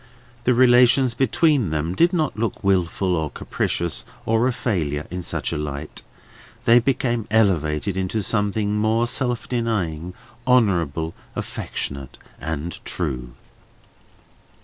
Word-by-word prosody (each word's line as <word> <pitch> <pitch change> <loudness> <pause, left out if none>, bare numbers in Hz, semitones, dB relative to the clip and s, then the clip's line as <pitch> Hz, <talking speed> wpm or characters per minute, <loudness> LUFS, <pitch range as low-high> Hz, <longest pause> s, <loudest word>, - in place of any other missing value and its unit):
The 125 - +4
relations 125 0 +5
between 135 - +2
them 80 +2 -1
did 170 - +4
not 160 -6 0
look 115 0 -3
wilful, 95 -1 +1
or 80 -2 -1
capricious, 85 +1 -2 0.2
or 115 +2 +2
a - - +2
failure, 80 - -2
in 90 0 -3
such - - -3
a - - -1
light; 75 0 -5 0.6
they 115 +1 +7
became 120 -3 0
elevated 95 -5 +2
into 95 +3 -1
something 105 0 0
more 110 +2 +2
self 125 -1 -1
denying, 90 -9 -2 0.3
honourable, 85 - +2 0.2
affectionate, 70 -2 -5 0.2
and 80 +1 -4
true. 60 -2 -4
100 Hz, 120 wpm, -22 LUFS, 80-120 Hz, 0.6 s, they